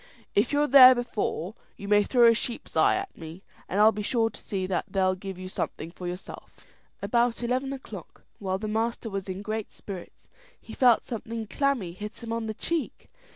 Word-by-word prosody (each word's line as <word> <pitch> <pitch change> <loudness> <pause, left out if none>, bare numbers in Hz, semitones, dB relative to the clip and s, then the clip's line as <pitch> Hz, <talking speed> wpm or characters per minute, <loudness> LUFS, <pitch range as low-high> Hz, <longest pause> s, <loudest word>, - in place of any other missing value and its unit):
If - - +2
you're 290 +1 +3
there 260 -2 +9
before, 220 -6 -3 0.2
you 200 - -8
may 205 0 +5
throw 240 +3 +4
a 230 - +7
sheep's 235 +1 -4
eye - - +4
at 390 +1 -5
me, 165 +3 -10 0.3
and 195 - -1
I'll 215 +1 +7
be 210 - -5
sure 225 +1 +1
to - - -13
see 190 -2 -3
that 185 -1 -1
they'll 190 -1 +1
give 190 0 -7
you 185 0 -7
something 170 -2 -5
for 180 0 -7
yourself." 180 +1 -9 0.4
About 235 +3 +1
eleven 255 +3 -1
o'clock, 270 -1 -9 0.2
while 190 -2 -2
the 215 +2 -5
master 225 +1 -2
was 195 -1 -4
in 190 +2 -5
great 215 0 -4
spirits, 190 -4 -10 0.3
he - - -12
felt 245 -3 +4
something 230 -1 -5
clammy 255 -6 -1
hit 210 +6 -8
him 230 0 -4
on 230 -1 -3
the 220 - -4
cheek. 335 +6 -4
215 Hz, 200 wpm, -27 LUFS, 190-240 Hz, 0.4 s, there